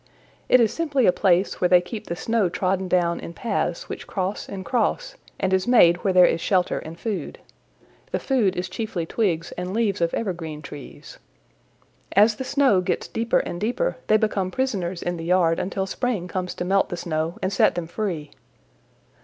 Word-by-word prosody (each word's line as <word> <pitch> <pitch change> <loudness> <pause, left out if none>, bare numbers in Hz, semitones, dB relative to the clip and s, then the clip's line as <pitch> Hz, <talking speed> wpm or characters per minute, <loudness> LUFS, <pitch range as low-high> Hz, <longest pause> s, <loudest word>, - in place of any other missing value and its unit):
It 255 - +7
is 225 -3 +3
simply 295 -7 +1
a - - +6
place 185 0 +1
where 180 - +4
they 180 0 +7
keep 205 +5 -7
the 170 - -3
snow 225 0 0
trodden 190 +1 -1
down 175 -1 +1
in 170 - -8
paths 235 - -2
which - - -7
cross 190 +1 -3
and 190 -1 -6
cross, 255 - -1 0.2
and 190 -1 0
is 190 +2 +1
made 175 -9 +6
where 190 +2 0
there 180 -1 +7
is 165 - +1
shelter 185 -2 +1
and 165 +2 -9
food. 200 -9 -4 0.7
The - - 0
food 225 -9 +1
is 180 0 -2
chiefly 185 -2 -4
twigs 170 -4 -1
and 180 +2 -4
leaves 215 -6 0
of 170 0 +2
evergreen 165 -7 -4
trees. 140 -1 -11 0.9
As 210 +2 +5
the - - -3
snow 260 -8 +3
gets 180 - -2
deeper 230 +1 +1
and 175 - -6
deeper 250 - -1
they 215 - +5
become 210 -3 0
prisoners 190 -8 -2
in 175 0 -2
the 165 - -6
yard 170 -2 +3
until 190 +1 -2
spring 210 -3 -2
comes 180 0 -4
to 175 - -4
melt 195 +1 +2
the 175 - -4
snow 160 0 -2
and 190 +1 0
set - - +3
them 175 -1 -3
free. 170 -4 -4
185 Hz, 190 wpm, -24 LUFS, 175-215 Hz, 0.9 s, It